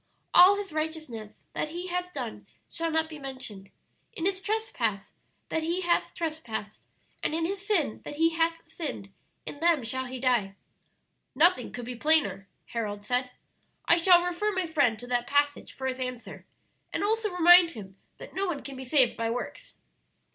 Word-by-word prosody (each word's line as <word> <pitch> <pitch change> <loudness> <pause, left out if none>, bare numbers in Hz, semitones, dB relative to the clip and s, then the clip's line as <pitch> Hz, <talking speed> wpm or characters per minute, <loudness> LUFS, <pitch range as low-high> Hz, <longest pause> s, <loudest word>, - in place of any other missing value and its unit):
All 370 +3 +9
his 400 -5 -5
righteousness 310 -9 -5
that 305 - -2
he 350 +3 -5
hath 360 0 -3
done - - -6 0.2
shall 330 0 -2
not 320 0 +1
be 310 -2 -9
mentioned: 255 -8 -6 0.4
in 330 - -4
his 385 0 0
trespass 270 - -2 0.4
that 320 - 0
he 340 +3 -1
hath 345 -1 0
trespassed, 310 - -5 0.4
and 310 - -1
in 325 0 0
his 390 +2 -3
sin 350 - 0
that - - -7
he 325 +2 +3
hath 330 0 0
sinned, 295 - -6 0.3
in 290 - -7
them 330 -4 +3
shall 260 +3 -1
he 255 0 -6
die.'" 235 -6 +1 0.8
"Nothing 310 -3 +4
could 245 -1 -6
be 250 - -5
plainer," 300 -7 +2 0.2
Harold 205 -3 -4
said. 250 +3 0 0.6
"I - - +7
shall 350 +1 +6
refer 355 +4 -1
my 375 -2 0
friend 285 -9 +2
to 245 - -9
that 245 -1 -1
passage 285 +1 +1
for 265 - -7
his 260 0 -2
answer, 250 -2 -6 0.4
and - - -2
also 440 +1 +1
remind 350 0 +7
him 195 -4 -10 0.2
that - - -11
no 390 +1 -1
one 315 -6 -3
can 275 - -7
be 260 - -7
saved 255 -2 +4
by 230 0 -1
works. 245 - -5
310 Hz, 175 wpm, -28 LUFS, 245-345 Hz, 0.8 s, All